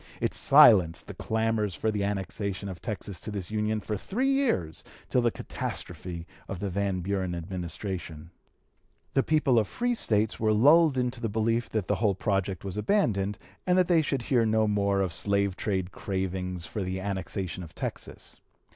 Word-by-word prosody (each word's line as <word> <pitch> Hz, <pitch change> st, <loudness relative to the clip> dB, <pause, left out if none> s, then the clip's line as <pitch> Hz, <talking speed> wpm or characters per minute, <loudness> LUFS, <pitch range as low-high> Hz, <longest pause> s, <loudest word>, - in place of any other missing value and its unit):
It -, -, 0 dB
silenced 85 Hz, -4 st, +6 dB
the -, -, -8 dB
clamors 110 Hz, -3 st, -1 dB
for 110 Hz, -, 0 dB
the 105 Hz, -2 st, -1 dB
annexation 100 Hz, 0 st, -3 dB
of 90 Hz, -3 st, -8 dB
Texas 100 Hz, -5 st, -4 dB
to -, -, -6 dB
this 100 Hz, -2 st, -5 dB
Union 110 Hz, 0 st, 0 dB
for 105 Hz, +2 st, -3 dB
three 245 Hz, -, -1 dB
years 240 Hz, -, 0 dB, 0.3 s
till 125 Hz, -, +3 dB
the 120 Hz, -, +3 dB
catastrophe 85 Hz, -5 st, -5 dB, 0.2 s
of 95 Hz, -, -5 dB
the 100 Hz, -1 st, -3 dB
Van 100 Hz, -1 st, -1 dB
Buren 95 Hz, -1 st, -1 dB
Administration. 85 Hz, -2 st, -5 dB, 0.8 s
The 135 Hz, -, +4 dB
people 140 Hz, -5 st, +3 dB
of 105 Hz, -, 0 dB
the -, -, -16 dB
free 245 Hz, 0 st, +1 dB
States 110 Hz, -, +1 dB
were 110 Hz, -1 st, +2 dB
lulled 145 Hz, +6 st, +5 dB
into 125 Hz, -1 st, -1 dB
the 115 Hz, -, -1 dB
belief 115 Hz, +3 st, 0 dB
that 110 Hz, -4 st, -2 dB
the -, -, +1 dB
whole 105 Hz, -4 st, +3 dB
project 95 Hz, -2 st, -1 dB
was 95 Hz, +1 st, -4 dB
abandoned, 105 Hz, -, +1 dB, 0.3 s
and 180 Hz, 0 st, +4 dB
that 180 Hz, -2 st, +4 dB
they 170 Hz, -3 st, +4 dB
should 135 Hz, -5 st, -1 dB
hear 120 Hz, -3 st, +2 dB
no 110 Hz, 0 st, +2 dB
more 100 Hz, -1 st, +1 dB
of 90 Hz, -3 st, -1 dB
slave 100 Hz, -1 st, +1 dB
trade 95 Hz, -2 st, -2 dB
cravings 90 Hz, -2 st, -3 dB
for 105 Hz, -, -4 dB
the 95 Hz, 0 st, -2 dB
annexation 95 Hz, -2 st, -3 dB
of 85 Hz, -3 st, -10 dB
Texas. -, -, -6 dB
100 Hz, 180 wpm, -28 LUFS, 95-115 Hz, 0.8 s, silenced